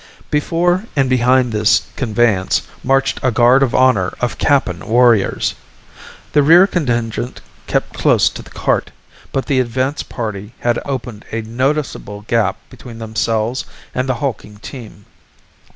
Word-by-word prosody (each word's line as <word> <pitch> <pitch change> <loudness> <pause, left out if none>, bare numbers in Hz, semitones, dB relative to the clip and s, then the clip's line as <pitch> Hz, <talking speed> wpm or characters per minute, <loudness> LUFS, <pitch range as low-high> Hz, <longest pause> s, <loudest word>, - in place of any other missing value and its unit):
Before 175 +6 +1
and 135 -3 +1
behind 125 0 +3
this 105 -1 +3
conveyance 110 -6 +1 0.2
marched 135 +1 +1
a 130 - +2
guard 120 +3 +4
of 135 -3 +1
honor 120 -8 +3
of 125 - -2
Kappan 130 -12 +1
warriors. 115 -3 +3 0.8
The 150 - +5
rear 165 +6 +7
contingent 120 - -2 0.3
kept - - -1
close - - +3
to - - -9
the - - -15
cart, - - -1 0.4
but 135 - -1
the 140 -3 +1
advance 130 +3 -1
party 110 -1 -6
had 120 -1 +1
opened 120 -6 -5
a 115 0 -3
noticeable 130 -3 -2
gap 115 +1 0
between 120 -2 -11
themselves 115 +2 -1 0.3
and 130 +1 -2
the 130 - +1
hulking 115 -5 -4
team. 110 -3 -10
120 Hz, 135 wpm, -17 LUFS, 110-135 Hz, 0.8 s, rear